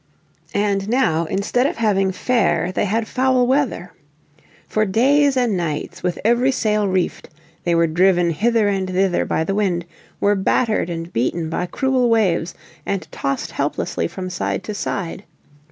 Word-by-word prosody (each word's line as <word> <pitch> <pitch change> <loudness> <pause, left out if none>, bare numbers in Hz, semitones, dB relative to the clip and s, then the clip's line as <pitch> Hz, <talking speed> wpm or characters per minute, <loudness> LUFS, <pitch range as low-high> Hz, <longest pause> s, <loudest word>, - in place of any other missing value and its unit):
And 200 -1 0
now 175 -10 +2
instead 210 - 0
of 330 - -4
having 195 -4 +2
fair 185 -4 +1
they 185 - 0
had 220 +3 -1
foul 255 -1 +2
weather. 255 -9 0 0.7
For 215 - +1
days 270 +7 +3
and 240 -5 +2
nights, 170 +1 -3
with 180 -1 -1
every 240 +3 +3
sail 215 -5 +1
reefed, 185 -2 -1 0.4
they 170 -1 +2
were 170 0 +4
driven 175 +1 +3
hither 220 +5 +2
and 195 -2 -1
thither 185 0 +1
by 160 - 0
the 195 - -2
wind, 185 -4 0 0.3
were 205 - +3
battered 205 0 +1
and 165 0 -5
beaten 160 +8 -1
by 180 +2 -2
cruel 255 +4 +1
waves, 180 -7 +1 0.3
and 195 -1 -3
tossed 135 0 -3
helplessly 85 - -2
from 185 - -6
side 180 - -2
to 210 - -5
side. 195 -2 -4
195 Hz, 155 wpm, -20 LUFS, 175-230 Hz, 0.7 s, were